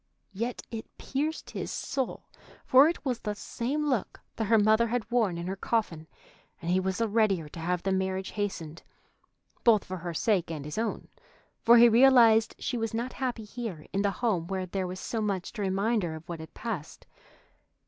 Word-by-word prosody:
Yet 230 +5 -3
it 225 -1 -6
pierced 300 +4 -3
his - - -4
soul, 265 -3 -3 0.4
for 270 +4 +7
it 340 - -5
was 250 -3 -1
the 210 -2 -3
same 275 +8 -2
look 255 -8 -1 0.2
that 225 - -1
her 225 +2 +4
mother 220 +2 +4
had 240 0 -2
worn 220 -8 +2
in 170 - -4
her 190 +2 -3
coffin, 190 -7 -2 0.5
and 170 0 -3
he 185 - +3
was 190 0 -1
the 230 - +1
readier 205 -7 +2
to 165 - -9
have 175 +1 -1
the 195 - 0
marriage 190 0 -1
hastened, 175 -6 -4 0.8
both 220 -4 +5
for 185 - -5
her 170 -1 -5
sake 190 -2 +1
and 155 -4 -5
his 150 +8 -4
own, 230 - -3 0.5
for 235 +1 +7
he 235 +1 +9
realized 230 -2 +6
she 250 - -3
was 225 0 -2
not 240 +3 -3
happy 250 -4 -3
here 210 -8 -6
in 195 - +1
the 200 - +2
home 195 -5 -1
where 190 0 -2
there 185 +1 -3
was 185 +1 -6
so 225 +2 -3
much 195 -4 -2
to 220 - -5
remind 200 +4 +1
her 165 -3 -3
of 160 +1 -11
what 170 -2 -5
had 160 - -11
passed. 200 -10 -6
210 Hz, 200 wpm, -28 LUFS, 185-235 Hz, 0.8 s, he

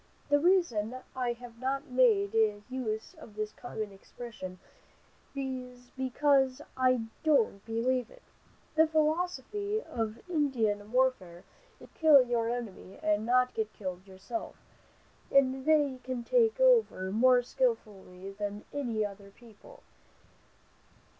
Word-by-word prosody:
The 290 0 +4
reason 285 - +2 0.2
I 250 -2 0
have 235 -1 -13
not 270 +2 -3
made 225 -5 +3 0.3
use 225 -4 -4
of 210 - -13
this 215 0 -3
common 215 -4 -6
expression 195 -2 -9 0.8
is, 250 -2 -6
because 265 0 +2 0.2
I 255 -2 +3 0.2
don't 230 -10 +2
believe 245 +3 0
it. - - -18 0.5
The 320 +1 +5
philosophy 350 - 0
of 225 +3 -5
Indian 230 - 0
warfare 240 -9 0 0.4
is, - - -13
to - - -30
kill 300 -5 +7
your 235 -2 0
enemy 230 -6 -6
and 210 +1 +1
not 250 +1 +3
get 220 -1 -3
killed 185 -1 -6
yourself, 190 - -6 0.8
and 265 0 +3
they 290 -4 +3
can 255 -2 -4
take 455 - +3
cover 475 - +3
more 250 +3 +4
skillfully 205 - -3
than 205 +1 -5
any 235 -7 -1
other 200 0 -9
people. 235 - -17
250 Hz, 120 wpm, -30 LUFS, 215-280 Hz, 0.8 s, kill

